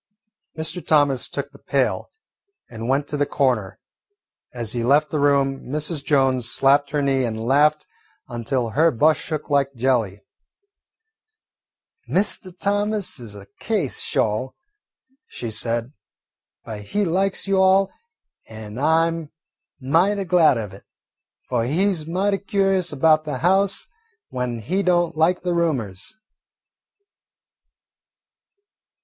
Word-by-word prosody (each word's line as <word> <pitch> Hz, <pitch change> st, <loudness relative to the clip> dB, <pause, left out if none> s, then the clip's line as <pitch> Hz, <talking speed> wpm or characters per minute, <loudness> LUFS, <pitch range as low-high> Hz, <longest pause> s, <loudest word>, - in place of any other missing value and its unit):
Mr. 160 Hz, +3 st, -5 dB
Thomas 145 Hz, -4 st, +2 dB
took -, -, -5 dB
the -, -, -17 dB
pail -, -, -1 dB, 0.6 s
and 115 Hz, +1 st, -6 dB
went 140 Hz, +2 st, +1 dB
to 150 Hz, -, -2 dB
the 145 Hz, 0 st, +1 dB
corner. 120 Hz, -9 st, 0 dB, 0.7 s
As 120 Hz, -3 st, -3 dB
he 120 Hz, -1 st, -2 dB
left 145 Hz, +5 st, +3 dB
the 155 Hz, -, -1 dB
room, 140 Hz, -1 st, +1 dB
Mrs. 150 Hz, +1 st, -2 dB
Jones 130 Hz, -5 st, +2 dB
slapped 140 Hz, +3 st, +3 dB
her 145 Hz, -1 st, -1 dB
knee 135 Hz, -1 st, +1 dB
and 110 Hz, -2 st, -3 dB
laughed 145 Hz, +6 st, +2 dB, 0.4 s
until 120 Hz, 0 st, -2 dB
her 160 Hz, +7 st, +4 dB
bust 150 Hz, +3 st, +2 dB
shook 155 Hz, -2 st, -5 dB
like 140 Hz, -1 st, +1 dB
jelly. 115 Hz, -5 st, 0 dB, 1.9 s
"Mr. 190 Hz, -1 st, -1 dB
Thomas 205 Hz, -4 st, -1 dB
is 110 Hz, -4 st, -9 dB
a 100 Hz, -1 st, -11 dB
case, 200 Hz, -, -1 dB
sho'," 110 Hz, +5 st, -1 dB, 0.7 s
she 115 Hz, -2 st, -6 dB
said; 115 Hz, +3 st, -2 dB, 0.7 s
"but 110 Hz, -3 st, -7 dB
he 205 Hz, -, -1 dB
likes 190 Hz, +3 st, 0 dB
you 195 Hz, -1 st, +3 dB
all, 190 Hz, +1 st, +4 dB, 0.6 s
an' 110 Hz, +1 st, -9 dB
I 160 Hz, +3 st, +3 dB
'm 165 Hz, -2 st, -4 dB, 0.5 s
mighty 175 Hz, +10 st, +2 dB
glad 175 Hz, -7 st, +4 dB
of 105 Hz, -4 st, -5 dB
it, 95 Hz, -, -13 dB, 0.6 s
fu' 125 Hz, -, -1 dB
he 145 Hz, +12 st, +1 dB
's 160 Hz, -3 st, -3 dB
mighty 195 Hz, +4 st, 0 dB
curious 195 Hz, -2 st, 0 dB
about 155 Hz, +2 st, +3 dB
the 145 Hz, -4 st, -3 dB
house 190 Hz, +5 st, +2 dB, 0.4 s
when 125 Hz, -2 st, -3 dB
he 180 Hz, -, -1 dB
don't 175 Hz, -3 st, +1 dB
like 170 Hz, +4 st, +2 dB
the 180 Hz, -1 st, 0 dB
roomers." 130 Hz, -, -2 dB
145 Hz, 130 wpm, -22 LUFS, 120-175 Hz, 1.9 s, her